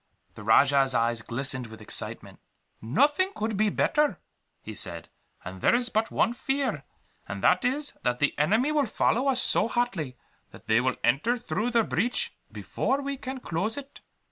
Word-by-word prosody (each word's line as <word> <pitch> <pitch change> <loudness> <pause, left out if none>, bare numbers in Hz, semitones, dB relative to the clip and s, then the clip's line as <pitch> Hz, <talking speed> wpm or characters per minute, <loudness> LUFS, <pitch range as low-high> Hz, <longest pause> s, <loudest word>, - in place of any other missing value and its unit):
The 105 - -11
rajah's 135 +4 +4
eyes 115 0 +1
glistened 130 +1 -2
with 110 0 -12
excitement. - - -4 0.4
"Nothing 290 - +2
could 220 0 -2
be 215 +1 +2
better," 295 - +1 0.5
he - - -7
said; - - -3 0.4
"and 95 +1 -8
there - - +4
is 245 0 0
but 220 0 0
one 230 - +1
fear, 270 +2 -2 0.4
and - - -6
that - - +4
is, 285 +4 -1
that 125 0 0
the 145 +2 +1
enemy 220 - +2
will 295 -4 +1
follow 245 +4 +1
us 260 -2 +2
so - - +2
hotly, 195 - -2 0.3
that - - -15
they 110 +2 +3
will 130 0 0
enter 150 - +2
through 230 0 -2
the 230 -2 +3
breach 250 - -1 0.2
before 270 - -1
we 280 0 -3
can 260 -1 -6
close 210 - -2
it." 280 0 -9
220 Hz, 170 wpm, -27 LUFS, -, 0.5 s, rajah's